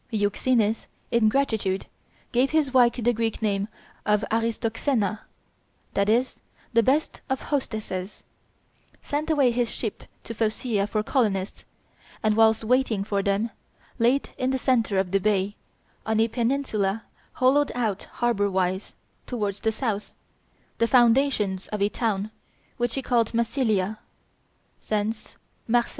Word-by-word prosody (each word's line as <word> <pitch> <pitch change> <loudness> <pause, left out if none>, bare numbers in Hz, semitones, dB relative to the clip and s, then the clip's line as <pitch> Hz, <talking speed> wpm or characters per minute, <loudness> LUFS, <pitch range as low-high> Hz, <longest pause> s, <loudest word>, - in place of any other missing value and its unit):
Euxenes, 215 +1 +1 0.2
in 230 -2 +4
gratitude, 215 -7 0 0.5
gave 250 +3 +3
his 305 -4 +1
wife 245 -2 +6
the 240 0 +1
Greek 225 -1 -1
name 200 -2 0 0.4
of 210 0 +2
Aristoxena 225 -1 0 0.7
(that 200 +1 +1
is, 245 +4 +1 0.3
"the 230 - +5
best 275 +7 +1
of 265 0 0
hostesses"), 215 -8 -4 0.8
sent 295 +2 -2
away 280 -6 +4
his 240 -1 0
ship 220 -4 -5 0.2
to 230 - -6
Phocea 215 -1 0
for 210 0 -1
colonists, 210 -6 -1 0.6
and, 215 -1 +3
whilst 220 0 +4
waiting 235 -3 +2
for 200 -1 -1
them, 200 +3 0 0.5
laid 245 +4 +2
in 255 - +1
the 265 - +1
centre 235 -6 +1
of 190 -2 0
the 195 - +3
bay, 200 0 +1 0.5
on 220 0 0
a 225 - +4
peninsula 230 -4 0 0.3
hollowed 275 +3 +3
out 220 -5 -1
harbor 230 -4 +1
wise, 190 0 -1 0.3
towards 205 -5 -2
the 220 - +1
south, 215 -3 -3 0.6
the 230 - +3
foundations 235 -6 +3
of 210 - -4
a 200 +1 +2
town, 215 -2 -1 0.5
which 240 -1 0
he 270 - -2
called 235 -2 +1
Massilia 220 -4 0 0.9
thence 215 +1 -2 0.3
Marseilles. 240 +1 +2
225 Hz, 135 wpm, -25 LUFS, 205-245 Hz, 0.9 s, wife